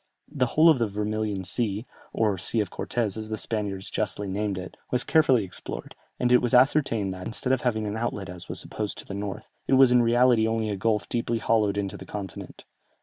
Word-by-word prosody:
The 135 -5 +1
whole 155 +7 +4
of 155 -6 +6
the 115 - +2
Vermilion 105 -1 -2
Sea, 105 +3 -1 0.3
or 105 -3 +1
Sea 110 +5 0
of 105 - -1
Cortès, 110 -5 -2
as 110 0 -5
the 110 - -2
Spaniards 100 -3 -3
justly 105 -1 -2
named 100 0 -2
it, 90 0 -7
was 125 - 0
carefully 135 -8 +4
explored, 95 - -7 0.3
and 125 - +1
it 125 - +6
was 120 -1 +1
ascertained 125 -7 +3
that, 90 0 -7
instead 125 +3 0
of 130 - +1
having 110 -4 0
an 105 +1 -3
outlet 110 -4 -3
as 90 -1 -8
was - - -2
supposed 105 -2 -4
to - - -9
the - - -7
north, 100 -1 -5 0.2
it - - +2
was 130 -1 +7
in 125 0 +6
reality 120 -1 +4
only 110 -1 0
a - - -1
gulf 105 +2 0
deeply 120 -1 -1
hollowed 110 -3 +1
into 100 -1 -2
the - - -10
continent. 100 -2 -7
110 Hz, 215 wpm, -26 LUFS, 100-120 Hz, 0.3 s, was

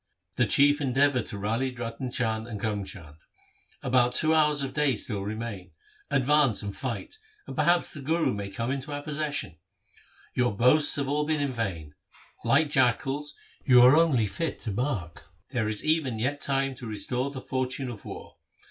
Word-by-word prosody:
The - - +2
Chief 145 +1 +5
endeavoured 135 -2 +2
to 100 - -5
rally 115 +6 -1
Ratan 120 +1 -5
Chand 110 -2 -1
and 110 -4 -6
Karm 105 -2 -2
Chand: 80 -6 -9 0.2
— - - -31
' - - -31
About 125 -1 +2
two 155 0 +4
hours 150 -2 +3
of 135 - -4
day 150 -4 +2
still 105 -1 -4
remain. 105 -2 -6 0.4
Advance 135 -4 +3
and 100 -1 -5
fight, 130 - -5 0.3
and - - -8
perhaps 175 0 +2
the 145 - -8
Guru 160 +1 0
may 100 -1 -5
come 115 +5 -3
into 140 +2 -4
our 145 0 -4
possession. 145 - -1 0.7
Your 120 -5 0
boasts 145 +6 +5
have 140 -1 -1
all 150 +2 0
been 155 -1 +1
in 140 -2 -1
vain. 90 -10 -4 0.5
Like 155 -2 +3
jackals 135 +2 +1 0.3
you 125 -2 +6
are 130 +3 +7
only 155 -9 +3
fit 165 - -3
to 110 - -4
bark. 100 - -3 0.2
There 120 -5 -1
is 110 -1 -2
even 155 -7 +1
yet 135 +6 -2
time 135 -1 0
to 120 - -7
restore 125 +5 -2
the 140 -1 -7
fortune 130 0 -3
of 110 - -10
war. - - -10
130 Hz, 185 wpm, -27 LUFS, 110-145 Hz, 0.7 s, are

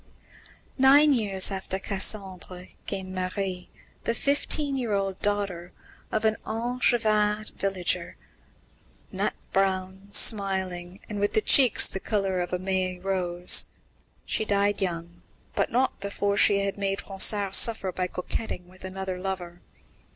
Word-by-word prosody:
Nine 285 +3 +6
years 200 -6 +2
after 190 0 -4
Cassandre 190 -2 -4
came 190 -1 -4
Marie, 185 0 -4 0.4
the 230 - 0
fifteen 285 +1 +1
year 240 -5 -2
old 195 -1 -2
daughter 200 -4 -2 0.4
of 220 0 -1
an 220 0 +2
Angevin 220 -2 +1
villager, 185 -3 -1 0.9
nut - - -1 0.2
brown, 190 0 -1
smiling, 190 -3 +2
and 210 -1 -5
with 205 - +1
cheeks 260 -6 +5
the 190 - -6
colour 195 -3 -1
of 175 - -3
a 180 - 0
May 185 0 -2
rose. 180 -2 +2 0.6
She - - 0
died 205 -1 0
young, 170 -1 -4 0.3
but - - -1
not 255 +3 0
before 200 0 -2
she 200 -1 +4
had 200 - -3
made 195 0 -2
Ronsard 195 0 +2
suffer 215 -5 +4
by 180 0 -2
coquetting 180 0 -5
with 185 +1 -18
another 190 -1 -5
lover. 180 -2 -5
195 Hz, 130 wpm, -26 LUFS, 185-210 Hz, 0.9 s, Nine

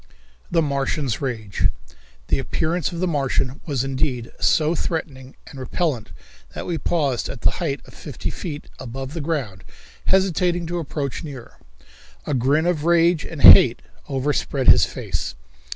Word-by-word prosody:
The 165 -1 +2
Martian's 140 -3 -1
Rage. 110 -7 -1 0.6
The - - +2
appearance 165 +5 -1
of 170 - -5
the 185 - +1
Martian 135 -3 -1
was 135 -5 0
indeed 130 -3 -2
so 155 +1 +3
threatening 140 -6 -4
and 135 - -11
repellent 130 - -2 0.5
that - - -5
we 170 -2 -2
paused 145 -8 0
at 120 - -7
the - - +4
height 145 -5 -2
of - - -16
fifty 145 -7 -6
feet 150 -5 -6
above 135 +3 -6
the 165 - -4
ground, 140 - -3 0.4
hesitating 180 -2 +2
to 175 +1 -3
approach 145 -3 -4
nearer. 135 -6 -10 0.7
A 150 - -2
grin 140 +5 +2
of 175 -4 0
rage 170 0 +3
and 155 -3 -7
hate 120 -1 +9 0.3
overspread 135 -1 0
his - - +7
face. - - -4
145 Hz, 150 wpm, -22 LUFS, 130-165 Hz, 0.7 s, hate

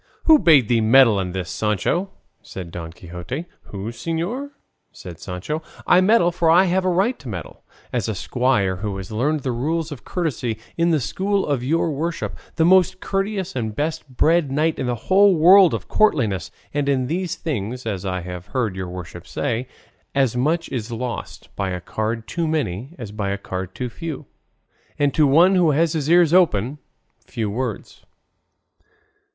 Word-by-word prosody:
"Who 315 -2 +7
bade 150 - +5
thee 115 -1 +2
meddle 115 -2 +6
in 90 -1 -3
this, 90 -1 -4
Sancho?" 110 - 0 0.3
said 90 -3 -8
Don 85 -1 -7
Quixote. 90 - -7 0.2
"Who, 100 +3 -6
señor?" 170 - -3 0.4
said 85 -4 -10
Sancho; 95 - -4 0.2
"I 180 - +5
meddle 185 -3 +4
for 170 -1 +1
I 175 +3 +6
have 185 0 +1
a 185 - +1
right 195 +8 +1
to 135 - -9
meddle, 85 -7 -7 0.3
as - - -1
a - - -2
squire 115 -7 0
who 100 0 -4
has 95 +1 -8
learned 145 +8 0
the 130 - -2
rules 155 +7 -2
of 145 - -8
courtesy 135 - -2 0.2
in 170 0 +2
the 160 -3 +3
school 195 - -1
of 140 -4 -1
your 160 +4 +1
worship, 160 +3 -3 0.2
the 160 - +3
most 185 +1 +4
courteous 195 -1 -2
and 110 -4 -3
best 150 -1 -3
bred 165 -3 +3
knight 155 +3 0
in 130 - -1
the 120 - 0
whole 190 - +4
world 180 +3 +7
of - - -4
courtliness; 115 - +1 0.2
and 145 -1 0
in 130 -2 +1
these 170 +5 -2
things, 125 -4 -4
as 100 -5 -3
I 90 -2 -2
have 90 0 -8
heard 115 -7 -1
your 95 -1 -5
worship 90 -1 -8
say, 120 +7 -2 0.5
as 135 -4 +2
much 160 +7 0
is 120 -3 -4
lost 120 +1 -6
by 100 -1 -2
a 90 -1 -3
card 110 +5 -3
too 170 -2 -2
many 135 - -2
as 110 -5 -7
by 105 -2 -3
a 100 - -1
card 95 -1 -6
too 125 -1 -3
few, 155 +3 -6 0.7
and 145 -1 +1
to 155 -3 +4
one 170 +7 +5
who 180 -4 +4
has 160 +2 +2
his 155 -2 -2
ears 170 -1 +5
open, 145 - +3 0.5
few 110 -3 -3
words." 125 +4 -5
135 Hz, 180 wpm, -22 LUFS, 105-170 Hz, 0.7 s, Who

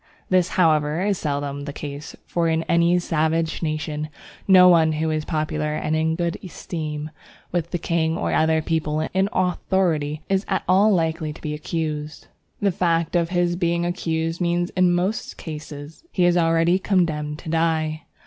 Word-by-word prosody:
This, 185 -1 +3
however, 155 -1 +3
is 200 -2 0
seldom 145 -1 -3
the 145 - -4
case, 145 0 -7
for 170 -1 0
in 160 0 +1
any 170 +2 +3
savage 160 -1 0
nation 155 -1 -3 0.4
no 185 -2 +8
one 165 -3 +5
who 155 +1 -1
is 155 -1 -2
popular 155 -1 -2
and 155 +1 -1
in 160 +1 +1
good 170 -1 -2
esteem 155 -4 -5 0.4
with 170 -1 -1
the 175 - -1
king 165 -1 0
or - - -1
other 160 0 +2
people 155 -1 -1
in 190 +1 +2
authority 175 -5 0
is 195 0 +1
at 190 - -1
all 195 +4 +5
likely 160 -3 0
to - - -13
be 150 -2 -3
accused. 150 -1 -4 0.3
The 200 -1 +2
fact 170 -1 0
of 170 -1 +2
his 175 -1 +1
being 170 -1 0
accused 165 -1 -2
means 175 0 0
in 185 -1 +3
most 185 +5 -1
cases 150 -1 -8
that 340 - -32
he 180 - +2
is 175 0 +4
already 165 +1 +3
condemned 155 -6 0
to 160 - -9
die. 160 -1 0
165 Hz, 170 wpm, -23 LUFS, 155-175 Hz, 0.4 s, no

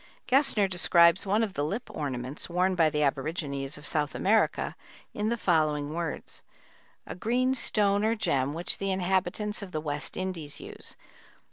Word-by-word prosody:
Gesner 260 -7 +4
describes 175 0 +4
one 210 +4 +2
of 205 -4 -3
the 145 - -1
lip 205 +11 -3
ornaments 135 0 -4
worn 180 +2 +1
by 165 -3 +3
the 150 0 0
aborigines 140 0 -2
of 145 - -9
South 150 -2 0
America 215 +3 +1 0.4
in 210 +1 -1
the 235 - 0
following 155 -6 +1
words: 165 -1 -3 0.6
A - - -6
green 250 +7 +1
stone 205 -5 +3
or 225 +1 +2
gem 140 - 0
which 170 +2 -1
the 195 - -1
inhabitants 190 +3 -1
of 195 -2 -8
the 155 - -1
West 145 -2 -4
Indies 175 -6 -4
use. - - -10
175 Hz, 160 wpm, -28 LUFS, 150-205 Hz, 0.6 s, Gesner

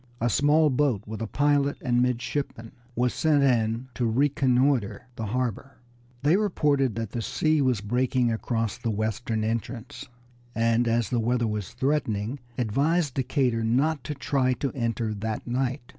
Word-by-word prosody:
A 120 +1 +1
small 150 +3 +4
boat 125 -6 +1
with 110 +1 -6
a 115 - -2
pilot 145 +2 +1
and 120 -3 +1
midshipman 125 -1 -2 0.2
was 125 +1 +1
sent 150 -3 +2
in 115 -1 +1
to 120 - -1
reconnoiter 130 -2 +2
the 110 -1 -4
harbor. 125 +3 -3 0.5
They 155 +6 +4
reported 145 - +1
that 115 -2 -4
the 120 - -3
sea 145 +6 +1
was 125 -6 +1
breaking 125 +3 +1
across 115 0 -2
the 120 - -2
western 110 +1 -2
entrance, 115 +3 -4 0.5
and 115 +1 +2
as 115 -2 +1
the 120 - +1
weather 120 +1 +1
was 105 -3 -3
threatening 125 -3 -1 0.2
advised 140 +6 +1
Decatur 125 -3 0
not 140 +7 +1
to 150 - -4
try 135 -1 +1
to 135 +2 -3
enter 115 -3 -1
that 110 +1 -4
night. 130 +2 -1
125 Hz, 155 wpm, -26 LUFS, 115-140 Hz, 0.5 s, small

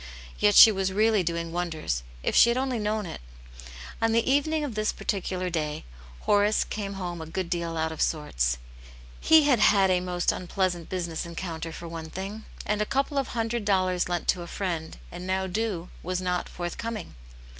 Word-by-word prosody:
Yet 105 - +4
she 220 - +11
was 190 -2 -1
really 215 +1 +3
doing 170 -1 -2
wonders, 165 - -2 0.2
if - - 0
she 235 - +8
had 235 - +1
only 260 -2 -1
known 210 0 -1
it. 165 - -7 0.8
On 225 0 +2
the 230 0 +2
evening 295 +3 +2
of 280 -5 -3
this 215 0 0
particular 185 -2 -2
day 150 - -2 0.4
Horace 205 +1 +3
came 200 -2 -4
home 175 -3 -5
a 160 - -7
good 175 +2 -4
deal 170 -2 -2
out 160 0 0
of 160 - -5
sorts. - - 0 0.6
He 320 -1 +6
had 275 -5 +4
had 195 -3 +5
a 180 - +3
most 180 -1 0
unpleasant 180 -2 -2
business 170 -3 -3
encounter 165 -1 -5
for 170 +1 -8
one 165 -1 -7
thing, 195 +5 -6 0.2
and 210 0 0
a - - +2
couple 275 +1 0
of 270 - -1
hundred 230 -1 -2
dollars 185 -3 +1
lent 175 -1 -2
to 180 - +2
a 170 - -7
friend, 170 -4 -4
and 180 +1 -7
now 190 0 0
due, 190 -2 -2
was 180 +1 -2
not 180 -1 -2
forthcoming. 200 +4 -5
185 Hz, 190 wpm, -27 LUFS, 170-215 Hz, 0.8 s, she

